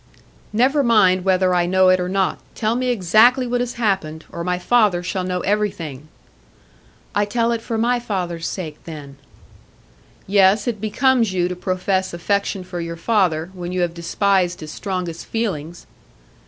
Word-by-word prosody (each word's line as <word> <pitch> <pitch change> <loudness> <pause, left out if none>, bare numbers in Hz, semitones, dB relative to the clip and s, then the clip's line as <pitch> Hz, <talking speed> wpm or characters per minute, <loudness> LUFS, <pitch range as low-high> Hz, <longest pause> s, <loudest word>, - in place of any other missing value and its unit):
"Never 260 +7 +3
mind 210 -7 +4
whether 185 -1 +2
I 175 -1 +2
know 185 +1 +4
it 185 0 +4
or 180 0 -2
not. 190 0 0 0.2
Tell 220 0 0
me 255 +1 -1
exactly 240 +4 +4
what 245 0 -1
has 245 0 -3
happened, 190 -9 -2
or 170 - -5
my 180 0 -1
father 195 -2 +2
shall 185 +1 -2
know 180 0 -2
everything." 185 -9 -2 1.1
"I 205 0 +2
tell 230 +2 0
it 230 -1 -1
for 225 0 -3
my 240 +2 +1
father's 180 -7 -3
sake, 155 -6 -6
then." 145 -4 -9 1.1
"Yes, 200 +2 +3
it 220 -4 -2
becomes 230 0 +2
you 175 -1 +1
to 180 - -4
profess 185 0 -1
affection 200 +1 -1
for 180 -1 -6
your 170 0 -5
father, 175 -4 +1
when 175 -1 -6
you 180 0 -1
have 175 -1 0
despised 180 +1 0
his 155 -1 -7
strongest 180 -4 -5
feelings." 175 -8 -4
190 Hz, 165 wpm, -20 LUFS, 175-215 Hz, 1.1 s, mind